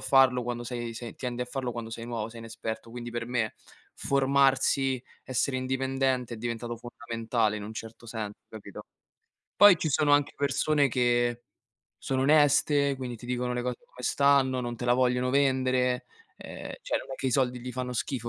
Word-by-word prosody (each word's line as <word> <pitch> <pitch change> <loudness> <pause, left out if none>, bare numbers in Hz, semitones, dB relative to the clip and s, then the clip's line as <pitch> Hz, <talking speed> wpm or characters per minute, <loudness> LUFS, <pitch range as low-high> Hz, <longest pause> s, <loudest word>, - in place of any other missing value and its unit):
farlo 130 -2 +4
quando 120 0 -3
sei 120 -1 -4
se 115 0 -7
tendi 125 -1 -3
a - - -6
farlo 130 -2 -3
quando 115 -1 -6
sei 115 +1 -6
nuovo, 115 -2 -3
sei 115 - -11
inesperto. 115 0 -6
Quindi, 120 0 -6
per 120 0 -4
me 120 -3 -1 0.4
formarsi, 135 -1 +2 0.2
essere 130 +1 0
indipendente 130 -1 -1
è - - -8
diventato 120 0 -4
fondamentale 115 -2 -2
in 105 - -6
un 105 - -7
certo 115 +1 -9
senso, 110 -2 -5
capito? 110 -2 -10 0.7
Poi 205 -4 +9
ci 160 - -1
sono 145 +1 +3
anche 145 0 +3
persone 145 +1 +2
che 120 -1 +1 0.6
sono 130 -1 0
oneste, 145 -1 +4
quindi 125 -2 -5
ti 120 - -11
dicono 125 0 -1
le 125 - -1
cose 125 -1 -2
come 125 - -13
stanno, 140 -1 +3
non 120 -1 -3
te 120 - -6
la 120 - +4
vogliono 125 0 +2
vendere, 130 -2 +2 0.3
ehm, - - -8
cioè - - -1
non - - -10
è - - -3
che 135 - -3
i - - -1
soldi 125 -1 +1
gli 125 +1 -6
fanno 125 0 -3
schifo 120 0 -3
125 Hz, 185 wpm, -28 LUFS, 120-135 Hz, 0.7 s, Poi